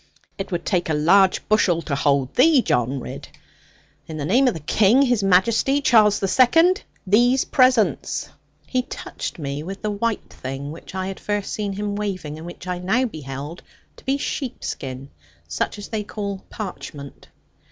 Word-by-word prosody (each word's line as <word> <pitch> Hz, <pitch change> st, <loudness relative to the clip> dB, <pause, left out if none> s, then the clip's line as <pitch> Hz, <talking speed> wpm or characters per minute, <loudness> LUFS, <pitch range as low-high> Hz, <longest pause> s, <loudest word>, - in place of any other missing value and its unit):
'It 195 Hz, -, -5 dB
would 175 Hz, -1 st, -3 dB
take 180 Hz, -4 st, 0 dB
a 155 Hz, -, +1 dB
large 185 Hz, +5 st, +4 dB
bushel 205 Hz, -6 st, +3 dB
to 145 Hz, -, -4 dB
hold 140 Hz, -2 st, +1 dB
thee, 275 Hz, -1 st, +5 dB
John 125 Hz, +3 st, 0 dB
Ridd. -, -, -8 dB, 0.8 s
In 160 Hz, -, -6 dB
the 145 Hz, -, -3 dB
name 250 Hz, -, +4 dB
of 245 Hz, -, +1 dB
the -, -, -5 dB
King, 210 Hz, -, +4 dB
His 245 Hz, -5 st, +2 dB
Majesty, 210 Hz, +9 st, +3 dB
Charles 215 Hz, -6 st, +5 dB
the 195 Hz, -, 0 dB
Second, 330 Hz, -, +4 dB, 0.2 s
these 245 Hz, +7 st, +4 dB
presents!' 255 Hz, -4 st, +2 dB, 0.4 s
He 255 Hz, -, 0 dB
touched 250 Hz, -, -7 dB
me 140 Hz, -2 st, -4 dB
with 195 Hz, +6 st, -7 dB
the 210 Hz, -, 0 dB
white 220 Hz, +2 st, -2 dB
thing 135 Hz, +2 st, -6 dB
which 165 Hz, +3 st, -11 dB
I 190 Hz, 0 st, -2 dB
had 195 Hz, 0 st, -5 dB
first 205 Hz, -1 st, -2 dB
seen 205 Hz, -2 st, -2 dB
him 205 Hz, +1 st, -3 dB
waving, 185 Hz, -7 st, -4 dB
and 165 Hz, -, -8 dB
which 175 Hz, -, -10 dB
I 180 Hz, -1 st, -3 dB
now 220 Hz, +9 st, +1 dB
beheld 150 Hz, -, -7 dB, 0.4 s
to -, -, -16 dB
be 270 Hz, +1 st, 0 dB
sheepskin, 140 Hz, -, -5 dB, 0.4 s
such 85 Hz, -, -2 dB
as 205 Hz, -, -8 dB
they 215 Hz, -2 st, -2 dB
call 200 Hz, -2 st, -5 dB
parchment. 150 Hz, -8 st, -8 dB
195 Hz, 175 wpm, -22 LUFS, 155-230 Hz, 0.8 s, thee